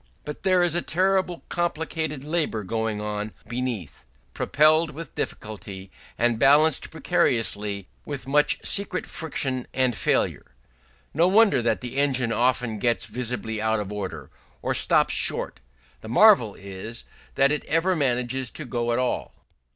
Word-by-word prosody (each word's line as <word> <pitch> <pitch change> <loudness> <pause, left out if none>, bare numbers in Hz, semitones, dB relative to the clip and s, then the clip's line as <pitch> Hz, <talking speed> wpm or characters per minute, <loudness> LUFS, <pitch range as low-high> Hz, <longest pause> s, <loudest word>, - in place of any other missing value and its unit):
But 150 - -7
there 185 -1 +3
is 175 -2 +1
a 175 - +1
terribly 185 0 0
complicated 160 -4 -2
labour 150 -8 -1
going 110 +1 -2
on 105 0 -4
beneath, 120 - -4 0.3
propelled 155 +2 +3
with 155 0 -9
difficulty, 100 -3 -6 0.3
and 120 -1 +1
balanced 145 +2 +4
precariously, 105 -4 0 0.2
with 140 -4 -6
much 150 +2 +3
secret 195 -2 +2
friction 135 -5 -3
and 130 -3 +1
failure. 65 - -1 0.6
No 165 +4 +3
wonder 200 - +4
that 115 -2 0
the 125 +1 -6
engine 130 -4 +2
often 120 -2 0
gets 120 -2 0
visibly 110 -1 -3
out 110 0 +1
of 105 0 -5
order, 90 -9 -6 0.3
or - - 0
stops - - +3
short: - - -1 0.4
the 110 - -10
marvel 125 - +5
is 100 +4 -8 0.3
that 140 +1 +4
it 150 - -1
ever 170 +4 +1
manages 130 -3 0
to 155 - -5
go 120 -2 -2
at - - 0
all. 125 -1 -2
125 Hz, 145 wpm, -25 LUFS, 110-155 Hz, 0.6 s, marvel